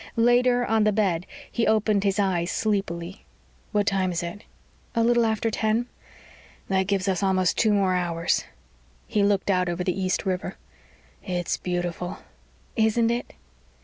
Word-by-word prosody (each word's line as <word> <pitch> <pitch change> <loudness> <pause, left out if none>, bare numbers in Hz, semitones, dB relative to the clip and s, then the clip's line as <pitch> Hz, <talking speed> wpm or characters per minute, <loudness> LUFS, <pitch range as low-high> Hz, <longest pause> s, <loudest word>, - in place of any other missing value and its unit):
Later, 245 +1 +4
on 220 -1 +2
the 215 - +3
bed, 190 -5 0 0.2
he 235 - 0
opened 215 -2 +2
his 200 0 +1
eyes 185 -4 +1
sleepily. 195 -3 -2 0.5
"What 205 -2 +1
time 190 -2 +1
is 170 0 -2
it?" 175 +5 -7 0.5
"A 230 - +3
little 235 0 +3
after 220 +1 0
ten." 220 +2 +1 0.8
"That 190 -1 +1
gives 200 -1 0
us 190 -1 0
almost 185 -2 +2
two 220 - +3
more 195 -2 +2
hours." 170 -2 0 0.6
He 215 -3 0
looked 200 0 +2
out 180 -1 +1
over 175 +1 -2
the 185 +1 -1
East 185 0 0
River. 185 0 -2 0.7
"It's 175 -2 -2
beautiful." 175 0 -3 0.6
"Isn't 225 +1 +2
it?" 240 +1 -3
195 Hz, 150 wpm, -25 LUFS, 180-220 Hz, 0.8 s, Later